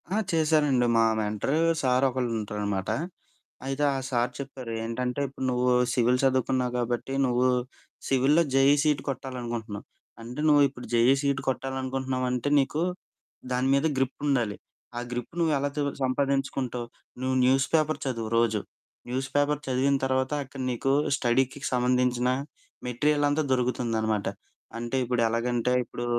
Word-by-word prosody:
ఆ! - - +1
చేశారండి 150 -6 +3
మా 115 - +5
మెంటరు 105 +7 -1 0.2
సారొకళ్ళు 130 -1 +1
ఉంటారనమాట. 105 -2 -3 0.8
అయితే 135 +2 -2
ఆ - - -1
సార్ 120 -1 0
చెప్పారు 130 -3 -7
ఏంటంటే 125 +4 -2
"ఇప్పుడు 130 0 -6
నువ్వు 125 0 +2 0.2
సివిల్ 125 +1 +3
చదువుకున్నావు 130 -1 +1
కాబట్టి, 120 +2 -2
నువ్వు 125 0 +2 0.6
సివిల్‌లో 135 +5 +4
జేఈ 135 +1 +5
సీట్ 150 -3 +2
కొట్టాలనుకుంటున్నావు. 120 -5 -5 0.4
అంటే 120 +5 -6
నువ్వు 145 -1 +6
ఇప్పుడు 125 -2 -10
జేఈ 120 +3 +5
సీట్ 140 -2 0
కొట్టాలనుకుంటున్నావు 130 0 -2
అంటే 125 +3 -1
నీకు 145 +3 0 0.7
దాని 125 +1 +1
మీద 140 +3 +2
గ్రిప్పుండాలి. 130 -4 0 0.4
ఆ - - -1
గ్రిప్ 120 +2 -5
నువ్వు 165 -2 +2
ఎలా 140 +1 -1
తే 150 - -1 0.2
సంపాదించుకుంటావు, 130 -2 -1 0.4
నువ్వు 130 0 0
న్యూస్ 130 +1 +3
పేపర్ 155 -1 +1
చదువు 115 -4 -3
రోజు." 115 -3 +2 0.5
న్యూస్ 130 +2 -2
పేపర్ 145 0 +2
చదివిన 135 +2 +2
తర్వాత 130 0 0
అక్కడ 135 0 -9
నీకు 125 +3 0 0.2
స్టడీకి 130 +1 +1
సంబంధించిన 125 0 +2 0.6
మెటీరియలంతా 145 +4 +1
దొరుకుతుందనమాట. 115 -4 0 0.5
అంటే 120 +2 -4
ఇప్పుడు 125 -1 0
ఎలాగంటే 120 +1 0
ఇప్పుడు, 120 +1 -6
130 Hz, 130 wpm, -27 LUFS, 120-135 Hz, 0.8 s, నువ్వు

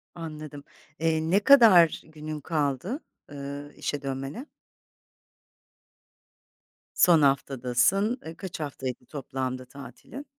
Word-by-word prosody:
Anladım. 155 -3 -8 0.4
Eee, 160 -1 +1
ne 200 - +5
kadar 210 - +6
günün 155 -1 -7
kaldı, 155 - -2 0.3
ııı, 140 +1 -7
işe 145 -1 -3
dönmene? 135 - -5 2.5
Son 165 -4 +6
haftadasın. 140 - +1
Iıı, 160 +1 -7
kaç 190 -4 -7
haftaydı 130 -4 -5
toplamda 130 -2 -5
tatilin? 140 - -11
150 Hz, 90 wpm, -27 LUFS, 135-170 Hz, 2.5 s, kadar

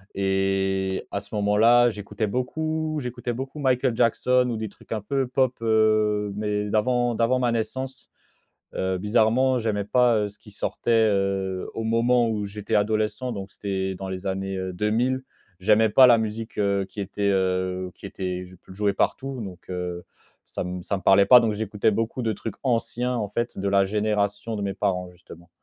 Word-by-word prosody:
et 95 0 0
à 100 - -1
ce 100 +2 -9
moment-là 115 +4 +4
j'écoutais 105 +1 -4
beaucoup 155 +7 -2
j'écoutais 125 -2 -4
beaucoup 135 +4 -6
Michael 130 -3 +1
Jackson 125 +2 +2
ou 115 - -2
des 110 -1 -4
trucs - - -21
un 110 - -2
peu 135 +5 -1
pop, 130 0 +1
heu, 110 -2 +2
mais 105 0 -2
d'avant, 120 +2 +1
d'avant 115 +3 +2
ma 125 -1 +1
naissance. 125 +4 -4 0.7
Heu, 95 0 -1
bizarrement 115 +6 +2
j'aimais 105 -2 -1
pas, 120 +2 +3
heu, 105 -1 0
ce 105 - -21
qui 105 - -15
sortait, 105 +3 -3 0.2
heu, 95 -1 -1
au 115 - -3
moment 115 +1 +2
où 105 -2 -2
j'étais 100 0 -4
adolescent 110 +4 0
donc 100 -4 -6
c'était 95 -1 -3
dans 95 +1 -6
les 95 +1 -6
années, 95 0 -2
heu, 95 0 -4
deux 105 +4 -1
mille. 130 +4 +1 0.4
J'aimais 110 +3 +4
pas 130 +5 +7
la 120 -2 +6
musique, 110 0 -4
heu, 100 -1 +1
qui 95 +2 -8
était, 100 +1 -1
heu, 95 -1 0
qui - - -10
était, 90 -2 -4
jou 90 0 -14
jouée 100 +2 0
partout. 135 +5 -1
Donc, 95 -4 -9
heu, 90 -1 -4 0.4
ça - - -5
me 90 0 -5
ça 100 - -2
me 95 - -8
parlait 95 +1 +6
pas, 125 +4 +9
donc 115 -2 +1
j'écoutais 105 0 0
beaucoup 115 +4 -2
de 110 -1 0
trucs 110 +1 -6
anciens 120 0 0
en 110 -4 -2
fait, 120 +4 -3
de 100 +1 -1
la 100 0 +4
génération 105 +1 -1
de 100 - -4
mes 100 -1 -2
parents 90 -3 -1
justement. 85 -1 -15
105 Hz, 185 wpm, -24 LUFS, 95-120 Hz, 0.7 s, pas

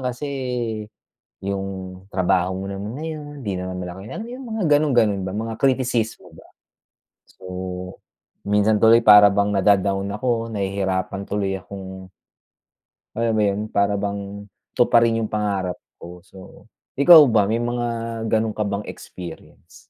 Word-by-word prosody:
kasi 125 +2 -4 1.1
yung 95 -1 -5
trabaho 90 0 +1
mo 95 - -5
naman 100 +3 -5
na - - -5
yun, 150 -2 -7
hindi 100 -6 -3
naman 90 0 -5
malaki" 90 +1 -7
alam - - -5
mo 240 - -9
yung 265 -1 -9
mga 220 -2 -2
gano'n-gano'n 120 -10 +2
ba, 95 - -4
mga 110 +2 -4
kritisismo 120 -7 0
ba? - - -15 0.8
So, - - -25 1.0
kung - - -8
minsan 105 +1 +3
tuloy 115 +1 +6
para 105 -1 +9
bang 100 +1 +1
nada-down 100 0 +2
ako, 115 +2 -1
nahihirapan 95 -1 -2
tuloy 100 -1 -1
akong 95 -1 -9 1.1
alam 115 0 0
mo 105 - +2
yon? 100 0 0
Para 100 0 +1
bang 100 0 -5 0.2
tuparin 115 -2 +3
yung 110 - -2
pangarap 100 -4 -2 0.2
ko. 90 0 -11
So, 95 -1 -15 0.3
ikaw 160 +4 +9
ba, 110 -3 +3
may 110 +4 0
mga 120 0 -2 0.4
gano'n 110 0 0
ka 105 - 0
bang 100 +1 -3
experience? 90 -2 -11
100 Hz, 145 wpm, -22 LUFS, 95-115 Hz, 1.1 s, para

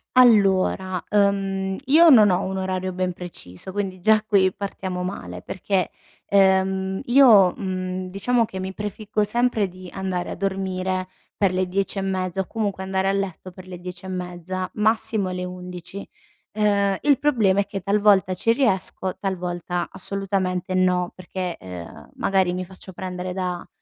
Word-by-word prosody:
Allora. 190 -6 +4
Uhm, 195 -1 +1
io 320 +5 +7
non 215 -7 +8
ho 180 +1 +1
un 190 0 -3
orario 185 -1 -2
ben 185 -1 -1
preciso, 175 - -10
quindi 190 -2 -3
già 215 +2 +4
qui 195 -4 +3
partiamo 190 -2 -4
male 90 - -5
perché, 190 - -1 0.4
ehm, 190 -1 +2
io, 240 -8 +7
mhmm, 185 -1 -4
diciamo 230 +5 +1
che 190 -3 -7
mi 190 +1 -4
prefiggo 210 0 -2
sempre 225 -1 +1
di 185 0 -11
andare 190 -2 -3
a - - -4
dormire 190 -1 -2 0.3
per 195 -3 +2
le 185 0 0
10 195 +2 -2
e 195 - 0
mezza 190 -1 -1
o 190 - -6
comunque 205 -4 -2
andare 190 0 -1
a - - +3
letto 190 -2 -3
per 185 0 -13
le 180 -1 -8
10 180 +1 -9
e - - -6
mezza, 180 0 -4
massimo 215 -2 +1
le 180 0 -3
11. 180 +1 -8 0.4
Ehm, 200 -2 +2
il 285 -3 +4
problema 215 -9 +3
è - - -3
che 195 -2 -5
talvolta 200 -2 +3
ci 230 +5 +2
riesco, 190 -6 0
talvolta 180 -2 -3
assolutamente 190 -2 -2
no, 180 -1 +2
perché, 185 -1 -5
ehm, 85 -5 -10
magari 190 -2 +2
mi 185 0 -3
faccio 190 0 -12
prendere 180 0 -5
da 180 -2 -3
190 Hz, 160 wpm, -23 LUFS, 185-200 Hz, 0.4 s, non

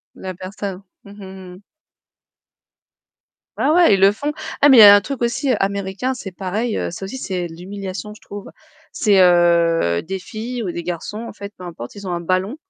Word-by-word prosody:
La 185 0 -7
personne, 190 +1 -7 0.2
mmh, - - -13
mmh, 190 -2 -11
mmh. 185 - -16 2.0
Ah 305 - +2
ouais, 345 -9 +5
ils - - -2
le 195 +1 +6
font. 285 +7 -3 0.3
Ah 290 - +7
mais 265 - +7
il - - +9
y - - +11
a 205 0 +10
un 205 - +4
truc 270 +4 -6
aussi 260 +3 0
américain, 200 +5 -2
c'est 215 -6 -8
pareil, 205 +5 -3
ça 180 - -8
aussi 195 +7 -6
c'est 185 -8 -3
de 165 - -12
l'humiliation, 195 +3 -7
je 210 - -17
trouve. 205 0 -9 0.4
C'est, 205 -4 +3
heu, 170 - +3
des 190 +3 -5
filles 230 +5 -6
ou 180 - -3
des 170 - -6
garçons 175 +5 -5
en - - -9
fait, 200 0 -9
peu 180 - -10
importe, 165 -9 -9
ils 200 -1 -8
ont - - -3
un 170 - -3
ballon. 185 - -1
195 Hz, 205 wpm, -20 LUFS, 180-210 Hz, 2.0 s, y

